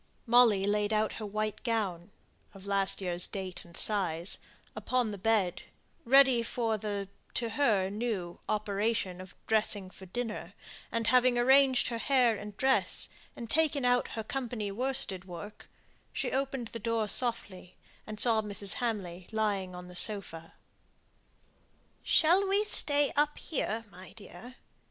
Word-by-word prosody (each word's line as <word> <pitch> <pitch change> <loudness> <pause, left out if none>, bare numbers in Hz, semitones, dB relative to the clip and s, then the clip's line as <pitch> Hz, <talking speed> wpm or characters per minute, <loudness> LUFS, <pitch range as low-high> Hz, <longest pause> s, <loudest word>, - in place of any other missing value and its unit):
Molly 230 -5 +5
laid 210 +1 0
out 215 0 +1
her - - -4
white 215 0 -3
gown 200 -7 -2 0.5
(of 195 0 -12
last 195 0 +3
year's 180 -1 +2
date 190 -2 -5
and 170 -1 -12
size) 180 -5 +1 0.4
upon 250 -4 -1
the 205 - -6
bed, 195 -4 +1 0.4
ready 265 -1 +5
for 230 -1 -1
the 205 -2 -4 0.3
(to 235 -1 -1
her 215 -6 +2
new) 205 -6 -4
operation 205 -3 -1
of 185 - -13
dressing 210 -3 0
for 190 - -13
dinner, 230 +3 -5 0.4
and 230 0 -1
having 250 +1 +4
arranged 265 +1 +4
her 230 -2 -4
hair 250 -3 +3
and 205 -1 -9
dress, 265 0 +1 0.3
and 235 - -7
taken 295 0 +1
out 245 0 +2
her 220 - -2
company 235 -4 -4
worsted 245 -5 -2
work, 195 +4 -10 0.4
she - - -3
opened 265 -3 -2
the 230 - -7
door 230 0 -1
softly, 205 -6 0 0.3
and 215 -1 -7
saw 225 -2 +5
Mrs. 200 -2 +3
Hamley 190 -7 -4
lying 200 -4 -1
on 180 0 -9
the 180 - -12
sofa. 180 -5 -2 1.5
"Shall 360 +5 +4
we 400 +2 +2
stay 290 -8 +2
up 295 0 +1
here, 230 -7 -3
my 185 +1 -13
dear? 225 +3 -12
215 Hz, 145 wpm, -30 LUFS, 195-245 Hz, 1.5 s, Molly